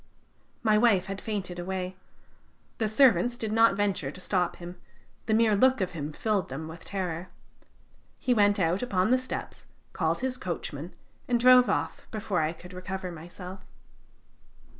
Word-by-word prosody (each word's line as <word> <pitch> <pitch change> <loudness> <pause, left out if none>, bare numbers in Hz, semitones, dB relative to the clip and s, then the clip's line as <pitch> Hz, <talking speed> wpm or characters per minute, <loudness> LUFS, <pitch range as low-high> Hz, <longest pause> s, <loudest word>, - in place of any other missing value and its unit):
My 215 -2 +4
wife 210 -6 +4
had 195 0 -5
fainted 190 -5 -4
away; 185 +1 -4 0.8
the 220 - +1
servants 235 -1 +4
did 220 -2 -2
not 225 -2 +5
venture 200 -8 0
to 165 - -9
stop 180 -1 0
him, 175 +1 -10 0.5
the 220 - +2
mere 220 -2 +4
look 260 +4 +4
of 185 -2 -1
him 155 -3 -5
filled 205 +3 -1
them 145 +4 -5
with 160 +2 -10
terror. 180 -3 -4 0.9
He 250 - +1
went 205 -2 +4
out 180 0 +1
upon 200 -3 +1
the 255 - +5
steps, 255 - -6 0.3
called - - 0
his 255 -1 -1
coachman, 170 -2 -5 0.3
and 240 -1 +2
drove 250 -1 +7
off - - -2
before 205 -5 -1
I 155 0 0
could 180 +2 -12
recover 185 0 -5
myself." 180 +3 -9
190 Hz, 160 wpm, -28 LUFS, 180-220 Hz, 0.9 s, drove